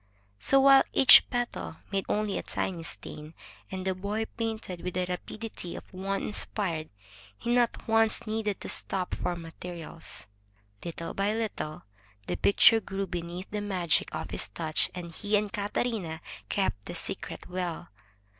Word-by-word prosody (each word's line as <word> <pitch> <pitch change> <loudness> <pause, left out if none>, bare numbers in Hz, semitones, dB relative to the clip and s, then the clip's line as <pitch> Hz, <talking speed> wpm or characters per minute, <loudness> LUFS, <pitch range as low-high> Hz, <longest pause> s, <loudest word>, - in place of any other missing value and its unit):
So, 275 - +5
while 275 0 +8
each 265 - +9
petal 90 - -2 0.2
made 195 -1 0
only 210 -1 +1
a - - -2
tiny 180 -3 -2
stain, 155 -1 -7 0.3
and 190 0 -4
the 190 - +2
boy 205 +4 -2
painted 220 -6 -3
with 180 0 -4
the 185 0 +1
rapidity 180 +1 -5
of - - -7
one 195 +2 -2
inspired, 180 -6 -2 0.5
he 240 - 0
not 240 -1 +2
once 225 0 +4
needed 215 -2 -1
to - - -5
stop 185 -2 -1
for 175 - -1
materials. 165 - -7 0.6
Little 170 0 -5
by 200 +1 +1
httle 210 -9 -3 0.4
the 90 - -1
picture 215 - +6
grew 195 -2 -3
beneath 175 +1 -5
the 210 0 -2
magic 185 -5 +1
of - - -4
his - - +1
touch, 155 - +2
and 175 -2 -6
he 210 +4 +1
and 205 +1 -2
Catarina 205 -5 -2 0.3
kept 190 - 0
the - - -6
secret - - -4
well. 180 -2 -3
190 Hz, 155 wpm, -29 LUFS, 170-215 Hz, 0.6 s, each